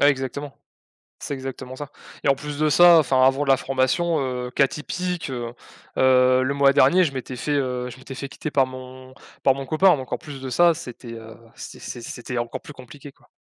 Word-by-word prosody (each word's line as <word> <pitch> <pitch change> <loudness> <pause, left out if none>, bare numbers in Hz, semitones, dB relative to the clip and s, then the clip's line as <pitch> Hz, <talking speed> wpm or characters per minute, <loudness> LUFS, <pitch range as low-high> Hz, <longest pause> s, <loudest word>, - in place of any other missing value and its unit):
Ah, 145 - +6
exactement, 140 +1 -3 0.6
c'est - - -5
exactement 130 -1 -7
ça. 145 +1 -8 0.3
Et - - +2
en 135 - +4
plus 145 +1 -7
de 155 +1 +2
ça, 175 +2 +7
enfin 130 -3 +2
avant 135 +2 +1
la 135 -2 +4
formation, 135 +6 0
heu, 125 -2 -3
cas 135 +2 +3
typique, 180 +3 -4
heu, 120 -2 -5 0.4
heu, 130 0 +4
le 130 +2 0
mois 140 -1 +4
dernier 140 +6 +5
je 155 - 0
m'étais 130 -1 -6
fait, 145 - -3
heu, 125 -3 -1
je 125 - -11
m'étais 130 +1 -10
fait 140 +1 -6
quitter 155 - -6
par 135 -2 +3
mon 130 0 -11 0.3
par 135 - +5
mon 135 0 -6
copain, 160 +5 +4
donc 130 -1 -6
en - - 0
plus 140 -3 -10
de 130 - -5
ça 170 +6 +4
c'était, 125 -6 -9
heu, 115 0 -10 0.2
c - - -10
c 120 - -7
c'était 125 +1 -6
encore 120 0 -3
plus 150 - -11
compliqué 140 +2 -12
quoi. - - -28
135 Hz, 220 wpm, -23 LUFS, 130-145 Hz, 0.6 s, ça